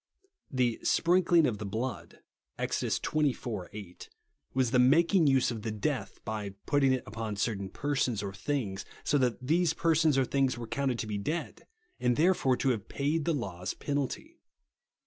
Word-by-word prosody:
The 125 Hz, -3 st, 0 dB
" -, -, -24 dB
sprinkling 175 Hz, -1 st, +4 dB
of 115 Hz, -7 st, -1 dB
the -, -, -4 dB
blood" 110 Hz, +3 st, -4 dB, 0.4 s
(Ex. -, -, -1 dB
xxiv. 125 Hz, -, -1 dB
8), 100 Hz, -4 st, -10 dB, 0.5 s
v,^as 130 Hz, -3 st, +2 dB
the 125 Hz, -, +4 dB
making 165 Hz, +6 st, +5 dB
use 135 Hz, -2 st, +3 dB
of 115 Hz, -2 st, -5 dB
the 110 Hz, -, -3 dB
death, 110 Hz, +1 st, -2 dB
by 105 Hz, -3 st, -4 dB
patting 140 Hz, -2 st, +3 dB
it 130 Hz, -1 st, 0 dB
upon 110 Hz, 0 st, -4 dB
certain 100 Hz, -2 st, -2 dB
persons 130 Hz, -5 st, -1 dB
or 100 Hz, -1 st, -4 dB
things, 105 Hz, -4 st, -2 dB, 0.2 s
so 145 Hz, -, +2 dB
that 125 Hz, 0 st, 0 dB
these 165 Hz, +2 st, +2 dB
persons 160 Hz, -3 st, +3 dB
or 135 Hz, -, +3 dB
things 135 Hz, -2 st, +1 dB
were 120 Hz, -, -5 dB
counted 130 Hz, +1 st, -1 dB
to 115 Hz, -, -3 dB
be 105 Hz, -1 st, -3 dB
dead, 155 Hz, +11 st, -4 dB, 0.3 s
and, 125 Hz, -1 st, +2 dB
therefore, 155 Hz, -6 st, +3 dB
to 135 Hz, -, +1 dB
have 110 Hz, -6 st, -2 dB
paid 145 Hz, +2 st, -1 dB
the 170 Hz, -, +2 dB
law's 95 Hz, -8 st, -4 dB
penalty. 145 Hz, -, -3 dB
130 Hz, 170 wpm, -30 LUFS, 110-145 Hz, 0.5 s, making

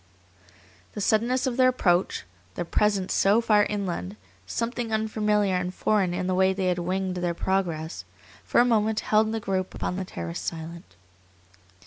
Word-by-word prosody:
The -, -, -6 dB
suddenness 235 Hz, +6 st, +1 dB
of 255 Hz, -2 st, -2 dB
their 255 Hz, -1 st, +6 dB
approach, 185 Hz, -8 st, +1 dB, 0.3 s
their -, -, -3 dB
presence 200 Hz, +1 st, +1 dB
so 200 Hz, +3 st, +4 dB
far 210 Hz, -3 st, +4 dB
inland, 175 Hz, -, -3 dB, 0.3 s
something 235 Hz, -, -3 dB
unfamiliar 210 Hz, -2 st, +1 dB
and 180 Hz, 0 st, -1 dB
foreign 195 Hz, -1 st, +1 dB
in 180 Hz, +1 st, -2 dB
the 185 Hz, -, 0 dB
way 190 Hz, +1 st, +3 dB
they 190 Hz, -1 st, 0 dB
had 180 Hz, -1 st, 0 dB
winged 185 Hz, +1 st, -2 dB
their 175 Hz, -1 st, -1 dB
progress, 170 Hz, -4 st, -2 dB, 0.4 s
for -, -, +2 dB
a 240 Hz, -, +6 dB
moment 220 Hz, -2 st, +2 dB
held 215 Hz, 0 st, +2 dB
the 225 Hz, -, -2 dB
group 190 Hz, -3 st, -2 dB
upon 180 Hz, -, -3 dB
the 190 Hz, -, -2 dB
terrace 85 Hz, -, -5 dB
silent. 165 Hz, -, -7 dB
195 Hz, 160 wpm, -26 LUFS, 180-215 Hz, 0.4 s, their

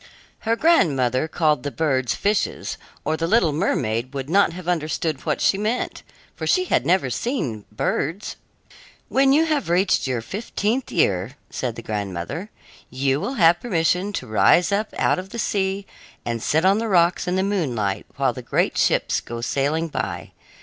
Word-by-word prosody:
Her 230 Hz, -, +4 dB
grandmother 145 Hz, -, +3 dB
called 155 Hz, -4 st, +1 dB
the 145 Hz, -, -3 dB
birds 135 Hz, -5 st, 0 dB
fishes, 205 Hz, 0 st, -1 dB, 0.3 s
or 155 Hz, -, +1 dB
the 165 Hz, +1 st, -2 dB
little 180 Hz, -5 st, +3 dB
mermaid 130 Hz, -, -1 dB
would 135 Hz, +2 st, -4 dB
not 200 Hz, 0 st, +4 dB
have 180 Hz, 0 st, -9 dB
understood 155 Hz, -3 st, -1 dB
what -, -, +1 dB
was -, -, +3 dB
meant, 215 Hz, +5 st, -2 dB, 0.3 s
for -, -, -4 dB
she 370 Hz, 0 st, +3 dB
had -, -, +1 dB
never 175 Hz, -7 st, +2 dB
seen 125 Hz, -, -2 dB
birds. 160 Hz, -, -2 dB, 0.7 s
"When 270 Hz, 0 st, +4 dB
you 310 Hz, +4 st, +4 dB
have 300 Hz, -, -1 dB
reached 180 Hz, -3 st, +2 dB
your 125 Hz, -3 st, -2 dB
fifteenth 220 Hz, -, -2 dB
year," 100 Hz, +9 st, +1 dB
said 120 Hz, -3 st, -3 dB
the 115 Hz, -, -8 dB
grandmother, 105 Hz, -, -4 dB, 0.4 s
"you 135 Hz, +2 st, 0 dB
will 265 Hz, -, -3 dB
have 175 Hz, -4 st, +5 dB
permission 180 Hz, -2 st, +1 dB
to -, -, -3 dB
rise 165 Hz, -, +4 dB
up 210 Hz, +2 st, 0 dB
out -, -, +2 dB
of 185 Hz, +1 st, -8 dB
the 235 Hz, -, -7 dB
sea 195 Hz, -2 st, -1 dB, 0.4 s
and 115 Hz, -1 st, -2 dB
sit 160 Hz, +8 st, +1 dB
on 195 Hz, +3 st, +4 dB
the 230 Hz, -, -2 dB
rocks 175 Hz, -1 st, +3 dB
in 180 Hz, -, 0 dB
the 190 Hz, -, +1 dB
moonlight, 125 Hz, -, -1 dB
while -, -, +1 dB
the -, -, -7 dB
great -, -, 0 dB
ships -, -, +2 dB
go 120 Hz, 0 st, -7 dB
sailing 145 Hz, +7 st, 0 dB
by. 100 Hz, -, -4 dB
165 Hz, 170 wpm, -22 LUFS, 130-200 Hz, 0.7 s, have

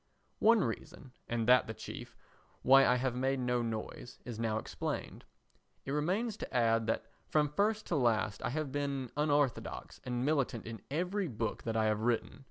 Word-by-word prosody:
One 225 Hz, -1 st, +5 dB
reason, 125 Hz, +2 st, -5 dB, 0.2 s
and 115 Hz, -1 st, -1 dB
that 125 Hz, -1 st, +6 dB
the 110 Hz, -, -5 dB
chief, -, -, -8 dB, 0.5 s
why 135 Hz, +1 st, +7 dB
I 125 Hz, -, +5 dB
have 125 Hz, 0 st, 0 dB
made 130 Hz, +2 st, 0 dB
no 125 Hz, -1 st, +1 dB
noise, 115 Hz, +1 st, -5 dB
is 120 Hz, -3 st, -6 dB
now 110 Hz, -1 st, 0 dB
explained. -, -, -4 dB, 0.6 s
It 135 Hz, -, -3 dB
remains 190 Hz, +10 st, 0 dB
to -, -, -6 dB
add 115 Hz, -1 st, +2 dB
that 110 Hz, -, 0 dB, 0.2 s
from 150 Hz, -1 st, +3 dB
first 215 Hz, +2 st, +1 dB
to 170 Hz, -, -1 dB
last 110 Hz, -6 st, +1 dB
I -, -, -1 dB
have 150 Hz, +1 st, -2 dB
been 140 Hz, -3 st, -2 dB
unorthodox 145 Hz, -3 st, 0 dB
and 125 Hz, 0 st, -2 dB
militant 140 Hz, -6 st, 0 dB
in 115 Hz, -1 st, -7 dB
every 180 Hz, +6 st, -1 dB
book 115 Hz, -4 st, -3 dB
that 115 Hz, -1 st, -1 dB
I 110 Hz, -, +3 dB
have 110 Hz, -1 st, +2 dB
written. 120 Hz, +3 st, 0 dB
125 Hz, 180 wpm, -33 LUFS, 115-150 Hz, 0.6 s, why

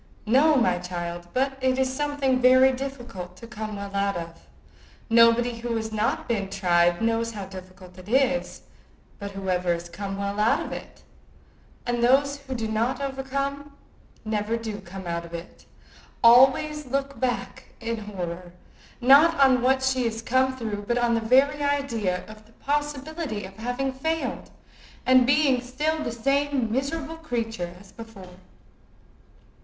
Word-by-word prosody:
"No, 280 Hz, +8 st, +4 dB
my 210 Hz, -9 st, +2 dB
child; 175 Hz, -1 st, -5 dB
but 270 Hz, +1 st, -1 dB
it 260 Hz, 0 st, +2 dB
is 260 Hz, 0 st, +1 dB
something 280 Hz, -2 st, 0 dB
very 260 Hz, +1 st, +6 dB
difficult 245 Hz, -9 st, -7 dB
to 230 Hz, -, -10 dB
come 215 Hz, -2 st, -6 dB
well 200 Hz, 0 st, -7 dB
out 200 Hz, -1 st, 0 dB
of. 165 Hz, -1 st, -9 dB, 0.6 s
Nobody 230 Hz, +1 st, +4 dB
who 235 Hz, 0 st, -3 dB
has 220 Hz, -1 st, -3 dB
not 215 Hz, +1 st, -1 dB
been 200 Hz, -5 st, -1 dB
tried 175 Hz, -1 st, +2 dB
knows 230 Hz, 0 st, 0 dB
how 200 Hz, -3 st, -6 dB
difficult 185 Hz, -1 st, -12 dB
it 185 Hz, +2 st, -12 dB
is; 265 Hz, +1 st, +1 dB, 0.6 s
but 200 Hz, -1 st, -5 dB
whoever 185 Hz, -2 st, -1 dB
has 170 Hz, 0 st, -3 dB
come 195 Hz, +2 st, -5 dB
well 200 Hz, +1 st, -3 dB
out 215 Hz, +2 st, +3 dB
of -, -, -8 dB
it, -, -, -9 dB, 0.8 s
and 240 Hz, -1 st, -1 dB
those 280 Hz, +3 st, +3 dB
who 275 Hz, -2 st, -7 dB
do 225 Hz, -2 st, -2 dB
not 230 Hz, +4 st, -1 dB
overcome 275 Hz, +1 st, -3 dB, 0.5 s
never 215 Hz, +1 st, -1 dB
do 220 Hz, -3 st, -6 dB
come 190 Hz, +1 st, -9 dB
out 170 Hz, 0 st, -3 dB
of 170 Hz, 0 st, -8 dB
it, 170 Hz, +1 st, -10 dB, 0.6 s
always 265 Hz, +5 st, +5 dB
looks 275 Hz, +1 st, -2 dB
back 250 Hz, -1 st, -2 dB
with 230 Hz, -1 st, -3 dB
horror, 175 Hz, -3 st, -6 dB, 0.5 s
not 280 Hz, +6 st, +6 dB
on 260 Hz, -2 st, +5 dB
what 265 Hz, +1 st, +2 dB
she 260 Hz, -1 st, +1 dB
has 225 Hz, 0 st, -3 dB
come 260 Hz, +2 st, +1 dB
through, 215 Hz, -4 st, -4 dB
but 240 Hz, -, +1 dB
on 240 Hz, -1 st, +2 dB
the 230 Hz, -, +1 dB
very 270 Hz, +6 st, +3 dB
idea 235 Hz, -10 st, -1 dB
of 215 Hz, 0 st, -14 dB
the 225 Hz, -, -23 dB
possibility 290 Hz, -, -3 dB
of 190 Hz, +1 st, -11 dB
having 245 Hz, +4 st, -2 dB
failed, 320 Hz, +5 st, -3 dB, 0.6 s
and 255 Hz, -1 st, +5 dB
being 275 Hz, -2 st, +3 dB
still 300 Hz, +6 st, -2 dB
the -, -, -3 dB
same 275 Hz, 0 st, 0 dB
miserable 295 Hz, +5 st, -2 dB
creature 225 Hz, -, -4 dB
as 195 Hz, 0 st, -17 dB
before." 195 Hz, -6 st, -12 dB
235 Hz, 155 wpm, -25 LUFS, 200-270 Hz, 0.8 s, very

